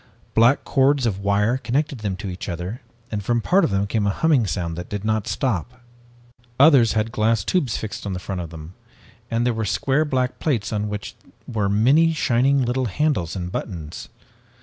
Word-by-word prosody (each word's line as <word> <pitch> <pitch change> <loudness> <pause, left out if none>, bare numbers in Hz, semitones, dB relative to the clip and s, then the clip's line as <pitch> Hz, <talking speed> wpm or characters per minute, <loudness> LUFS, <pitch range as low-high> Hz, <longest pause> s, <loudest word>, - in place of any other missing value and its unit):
Black 120 +5 +4
cords 135 -1 +2
of 100 -4 -1
wire 100 +4 +1
connected 135 +1 -1
them 100 -3 -2
to 100 +2 -7
each 90 -1 -6
other 90 +8 -5 0.3
and 105 -2 -3
from 120 +3 +1
part 185 - +3
of - - +2
them 100 0 0
came 105 0 0
a - - +3
humming 135 0 +2
sound 85 -4 -3
that 90 +1 -7
did 105 0 -4
not 110 0 0
stop. 120 - -2 0.8
Others 135 -6 +6
had 110 +1 0
glass 110 -2 +1
tubes 140 - 0
fixed 110 -2 -6
on 100 - -3
the - - -3
front 90 0 -5
of 85 - -6
them, 80 +1 -10 0.6
and 115 +1 0
there 125 - +2
were 110 0 -2
square 135 +8 +1
black 130 -4 -1
plates 115 -8 -1
on 105 0 -1
which 105 +3 -6 0.3
were 105 -5 -1
many 135 +11 +4
shining 135 -1 +2
little 125 +2 0
handles 110 - -1
and 90 -1 -4
buttons. 85 -7 -6
110 Hz, 195 wpm, -22 LUFS, 100-130 Hz, 0.8 s, Others